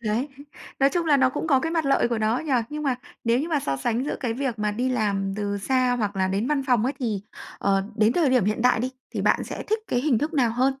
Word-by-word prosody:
Đấy, 225 +7 0 0.5
nói 275 +1 +5
chung 345 0 -1
là 295 -2 +5
nó 260 -1 +4
cũng 295 - -3
có 275 -4 +4
cái 325 +4 -2
mặt 325 -3 0
lợi 275 -3 +3
của 235 -2 -1
nó 220 +3 +1
nhỉ? 310 -1 -3 0.2
Nhưng 300 0 -4
mà 275 -3 +1 0.3
nếu 230 +1 +3
như 315 - -3
mà 305 -4 +1
so 135 - -2
sánh 230 - -1
giữa - - -3
cái 245 -4 -1
việc 250 -1 -3
mà 210 0 0
đi 245 +5 -1
làm 200 -5 0
từ 205 -1 -2
xa 255 +4 +1
hoặc 205 -3 -2
là 190 0 +1
đến 200 +4 -1
văn 290 -1 +1
phòng 245 -4 +3
ấy, 265 - 0
thì, 220 -7 -2 0.4
ờ, 195 -1 +1
đến 215 +1 +4
thời 315 -3 +2
điểm 250 -6 +3
hiện 215 +3 0
đại 250 -2 +4
đi, 255 +2 -1 0.2
thì - - -1
bạn - - +2
sẽ - - -6
thích 435 +2 0
cái 245 - +1
hình 265 -4 +2
thức 300 +7 -2
nào 250 -5 +3
hơn? 245 +3 +1
245 Hz, 285 wpm, -24 LUFS, 215-275 Hz, 0.5 s, nói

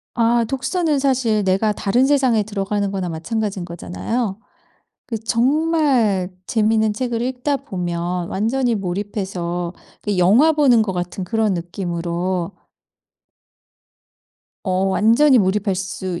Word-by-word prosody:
아 235 0 +3
독서는 290 +5 0
사실 255 -6 +1
내가 195 +3 +2
다른 220 +5 +1
세상에 265 -6 +3
들어가는 205 -1 -2
거나 190 -2 -3
마찬가지인 190 +4 -3
거잖아요. 195 +5 -3 0.7
그 230 -4 -3
정말 245 - +1 0.2
재미있는 220 -1 +2
책을 240 0 -2
읽다 255 +3 -1
보면 175 -6 -3
완전히 235 +4 0
몰입해서 185 -3 -3 0.3
그 205 -2 -2
영화 215 - +5
보는 275 -7 +4
것 205 -3 -2
같은 180 +1 -4
그런 220 +1 0
느낌으로 175 0 -3 2.1
어 185 -1 +1
완전히 230 +8 +4
몰입할 200 0 +1
수 190 -1 -4
210 Hz, 260 characters per minute, -20 LUFS, 185-245 Hz, 2.1 s, 영화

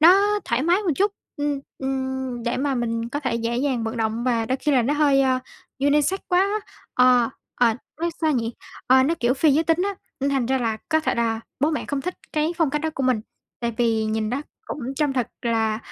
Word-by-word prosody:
nó 395 +5 +6
thoải 235 +3 0
mái 355 +6 +3
một 345 -6 +1
chút, 405 +1 +2 0.2
ừm, 290 -1 -1 0.2
ừm, 265 -2 -3
để 235 +1 -1
mà 275 +1 0
mình 230 -1 -1
có 290 +4 -3
thể 255 -5 -1
dễ 230 +1 -1
dàng 255 -3 0
vận 225 +2 -3
động 225 +1 -1
và 230 -3 +1
đôi 260 - 0
khi 295 +1 0
là 250 -3 +4
nó 285 +5 +1
hơi, 285 -2 +4
à, 260 -1 +2 0.4
unisex 295 +7 +2
quá 355 - +3
á. 405 +2 +2 0.4
Ờ, 250 -2 +5 0.3
ờ, 235 -2 +3 0.3
nói 340 0 +1
sao 315 -2 +3
nhỉ? 230 -2 -1 0.3
Ờ, 260 +1 +6
nó 320 +5 +2
kiểu 240 +2 +3
phi 295 +1 +4
giới 320 +2 +3
tính 325 +1 +2
á, 400 0 -1 0.3
nên 280 +1 +1
thành 265 -4 +1
ra 265 0 +1
là 225 -3 0
có 315 -1 +3
thể 315 - 0
là 230 -1 0 0.2
bố 300 +3 +3
mẹ 305 - -2
không 285 -1 -2
thích 365 +6 -3 0.2
cái 310 +2 +1
phong 325 -5 +2
cách 300 0 -1
đó 320 - -1
của 270 - -2
mình, 255 -4 +2 0.4
tại 235 -1 -2
vì 225 -2 +2
nhìn 215 0 -1
nó 275 +4 -2 0.2
cũng - - -5 0.2
trông 295 -3 +1
thật 250 -3 -1
là, 225 -2 +1
265 Hz, 235 wpm, -23 LUFS, 235-300 Hz, 0.4 s, nó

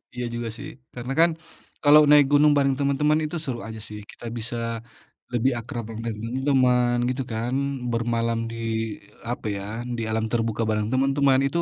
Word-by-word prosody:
Iya 125 - -3
juga 120 0 -3
sih, - - -7 0.3
karena 125 +2 -4
kan 170 +1 +7 0.5
kalau 150 +1 +8
naik 150 -1 +8
gunung 145 +1 +6
bareng 135 -1 +3
temen-temen 150 +2 +2
itu 155 - -5
seru 120 -3 -3
aja 110 -1 -7
sih. 105 0 -7
Kita - - -12
bisa 115 +1 -5 0.8
lebih 125 +3 +2
akrab 120 0 -5
de - - -5
dengan 115 0 -3
teman-teman 125 0 +2
gitu 130 +1 -2
kan, 115 +3 -2 0.4
bermalam 115 0 0
di - - -6 0.8
apa 120 - -4
ya, 100 - -5 0.3
di 115 - -3
alam 110 0 0
terbuka 115 -1 0
bareng 105 -1 0
teman-teman 135 0 +3
itu 170 +5 -1
125 Hz, 170 wpm, -24 LUFS, 115-140 Hz, 0.8 s, kalau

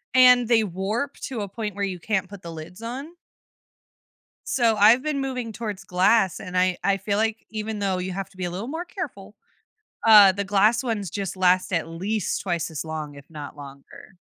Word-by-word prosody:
and, 250 -2 +7
they 230 -2 +4
warp 205 +9 -3
to 245 -6 -4
a 200 - -4
point 210 -1 -5
where 200 0 -1
you 185 -3 -5
can't 190 0 -1
put 200 -2 -10
the 170 - -8
lids 165 +6 -10
on. 270 +9 -6 1.3
So, 235 -3 +2
I've 220 +4 +6
been 300 -1 -2
moving 255 -4 -3
towards 210 -3 -5
glass, 190 +1 +2
and 180 0 -8
I 180 -1 +2
I 200 0 +2
feel 200 +1 -2
like, 220 +1 -1
even 215 -1 -4
though 195 -2 0
you 185 +1 -3
have 195 0 -5
to 195 - -22
be 185 - -3
a 175 - -3
little 195 +6 -5
more 325 +5 -4
careful, 215 - -7 0.7
uh, 210 -3 +9
the 200 +1 -3
glass 205 +4 +3
ones 215 -7 -2
just 195 0 -4
last, 185 0 +2
at 165 -2 -1
least, 195 +6 -2
twice 175 -3 -2
as 155 0 -5
long, 155 -2 -5
if 140 0 -13
not 150 -2 -9
longer. 140 +6 -13
200 Hz, 200 wpm, -24 LUFS, 180-225 Hz, 1.3 s, uh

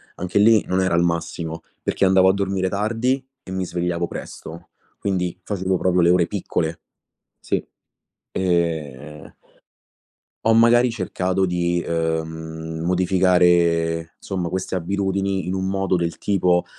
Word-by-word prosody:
anche 90 +3 -1
lì 110 0 +5
non 95 +1 0
era 95 -2 +1
il 85 - +3
massimo, 85 -1 -2 0.2
perché 100 - +1
andavo 95 0 +5
a - - +4
dormire 95 -1 -1
tardi 115 +6 0 0.2
e 95 - -10
mi 95 0 -2
svegliavo 85 -1 -2
presto, 80 +1 -9 0.3
quindi 90 -3 -2
facevo 95 -2 -1
proprio 90 0 +2
le 85 - +4
ore 90 -1 +4
piccole. 85 -4 -3 0.6
Sì. - - -1 0.7
Ehm 80 -5 -2 1.1
ho 115 - +5
magari 120 +2 +5
cercato 95 -3 -1
di, 85 -1 0
uhm, 80 -1 -3
modificare, 90 -2 +2
somma 90 -4 -4
queste 95 0 -3
abitudini 95 0 -1
in 90 - -2
un 95 0 -1
modo 95 -1 0
del 85 -1 -1
tipo: 90 -3 +1
90 Hz, 130 wpm, -22 LUFS, 85-95 Hz, 1.1 s, lì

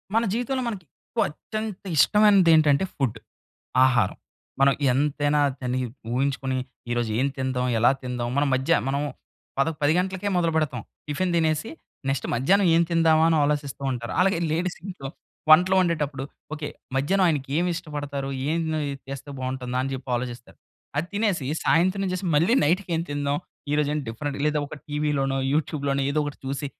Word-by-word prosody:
మన 230 - +4
జీవితంలో 250 +3 -1
మనకెక్కువ 185 - -4
అత్యంత 215 +5 -6
ఇష్టమైనది 205 -1 +5
ఏంటంటే, 150 0 +4
ఫుడ్. 125 -5 -1 0.7
ఆహారం. 125 -7 +2 0.4
మనం 135 0 +5 0.2
ఎంతైనా 145 +2 +1 0.2
తిని 125 0 -1 0.3
ఊహించుకుని, 130 0 0 0.3
ఈ - - +1
రోజు 120 -2 0
ఏం 135 - +2
తిందాం, 130 -1 -1
ఎలా 120 +2 +5
తిందాం 125 -1 -3
మన 145 - +3
మధ్య 130 +1 +1 0.2
మనం 140 +1 0 0.6
పద 140 - +3
10 145 +1 +4
గంటలకే 190 +2 -1
మొదలుపెడతాం. 160 -7 +1 0.3
టిఫిన్ 175 +5 -1
తినేసి 160 +3 +1 0.4
నెక్స్ట్ 135 -1 -1
మధ్యాహ్నం 185 +12 +3
ఏం 165 - +5
తిందామా 165 -1 +4
అని 165 - +3
ఆలోచిస్తూ 145 -2 -2
ఉంటారు. 120 -1 -5
అలాగే 190 -1 +3
లేడీస్ 175 +3 -1
ఇంట్లో 180 -9 -6 0.4
వంటలు 180 +4 +7
వండేటప్పుడు, 150 -6 -1 0.3
ఓకే. 150 -1 -5 0.3
మధ్యాహ్నం 185 +8 +2
ఆయనకి 145 -5 0
ఏమి 175 +1 +1
ఇష్టపడతారు, 145 -4 -5 0.2
ఏం 160 - +1
ఉన్నాయి 155 -3 -1 0.2
చేస్తే 135 +1 -7
బావుంటుందా 130 -1 -3
అని 135 - -3
చెప్పి 130 0 -7
ఆలోచిస్తారు. 120 0 -6 0.4
అది 165 - 0
తినేసి, 200 -9 0 0.2
సాయంత్రం 185 +4 +2
చేసి 185 +1 -3
మళ్ళీ 170 +11 +4
నైట్‌కేం 170 +1 +1
తిందాం, 145 0 0 0.4
ఈరోజు 150 -1 +2
ఏం - - 0
డిఫరెంట్ 140 +5 -4
లేదా 150 0 +1
ఒక - - -8
టీవీలోనో, 145 -3 0
యూట్యూబ్‌లోనో 140 -2 0
ఏదో 145 - 0
ఒకటి 145 0 -6
చూసి, 135 +1 -3
145 Hz, 150 wpm, -25 LUFS, 135-170 Hz, 0.7 s, వంటలు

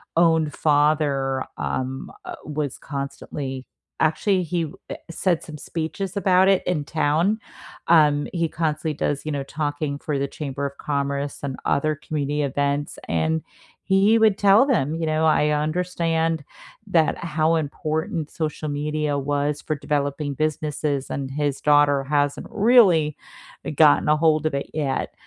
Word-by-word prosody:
own 160 -2 +3
father, 145 -3 +1
um, 130 +1 -3
uh, 360 -1 -7
was 150 -3 -3
constantly 140 -1 -6 0.4
Actually, 180 +4 +2
he, 165 -2 -2 0.2
eh, - - -4 0.2
said 175 0 0
some 150 -2 -9
speeches 170 +6 -4
about 190 -1 +4
it 195 -1 +3
in 155 -5 -1
town, 160 +8 +1 0.5
um, 150 -3 +5
he 170 -2 0
constantly 155 -1 -2
does, 145 0 -2
you 155 - -2
know, 140 -1 -2
talking 145 0 -3
for 150 -2 -2
the 140 - 0
Chamber 140 -1 -4
of 140 0 -5
Commerce 140 0 -2
and 135 -2 -3
other 155 +2 +1
community 150 -1 -2
events, 140 +1 -1
and 160 0 +1 0.4
he 200 +4 +4
would 220 -3 +4
tell 205 +6 +6
them, 165 - +1
you 165 -1 -2
know, 155 0 +1
"I 150 -1 +3
understand 165 0 0 0.4
that 160 -2 +2
how 160 0 +1
important 155 +2 -2
social 155 -1 -3
media 150 0 -1
was 145 +1 -1
for 155 - -2
developing 145 0 -2
businesses, 150 -1 -2
and 135 -1 -3
his 145 -1 -1
daughter 145 -2 +4
hasn't 145 0 0
really 195 - +4 0.6
gotten 150 0 +5
ahold 155 0 +3
of 155 - 0
it 140 0 -3
yet." 145 -4 -2
150 Hz, 145 wpm, -23 LUFS, 145-165 Hz, 0.6 s, tell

